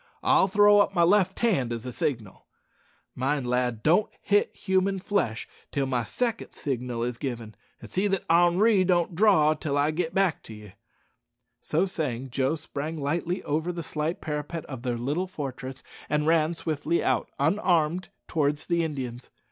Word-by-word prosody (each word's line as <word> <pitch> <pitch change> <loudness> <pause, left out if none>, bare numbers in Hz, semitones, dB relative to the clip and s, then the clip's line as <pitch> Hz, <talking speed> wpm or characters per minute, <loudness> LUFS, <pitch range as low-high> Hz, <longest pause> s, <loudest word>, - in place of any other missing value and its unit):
I'll - - +4
throw 205 +1 +5
up 200 -1 +2
my 170 - +4
left 190 +1 +3
hand, 160 - +1
as 115 0 -4
a 125 - -4
signal. 115 -6 -4 0.7
Mind, 135 +1 -1
lad, 125 -2 -1
don't 175 +7 +3
hit 205 0 +2
human 190 0 +1
flesh 180 - -1 0.2
till 140 -1 0
my 125 -3 0
second 235 - -3
signal 125 -3 -3
is 120 0 -3
given, 120 -5 -5 0.3
and - - -10
see 190 +3 0
that 195 -2 -1
Henri 180 +5 +4
don't 175 -1 +1
draw 165 -5 +4
till 150 -2 -2
I 145 +2 +2
git 165 +1 -3
back 190 -4 +2
to 110 - -9
ye." 105 -2 -13 0.9
So 160 +5 0
saying, 135 -8 -3
Joe 135 +4 +1
sprang 155 +1 -5
lightly 165 +5 -2
over 155 +4 -1
the 170 -1 -5
slight 155 +3 -3
parapet 150 +1 -4
of 130 -4 -7
their 120 -2 -2
little 145 +10 -1
fortress, 135 -5 -6 0.3
and 150 +1 +1
ran 160 +1 +2
swiftly 160 +1 -1
out, 130 -3 0
unarmed, 170 +1 +1 0.2
towards 150 -1 0
the 170 -1 +1
Indians. 130 -6 -5
155 Hz, 165 wpm, -26 LUFS, 130-180 Hz, 0.9 s, throw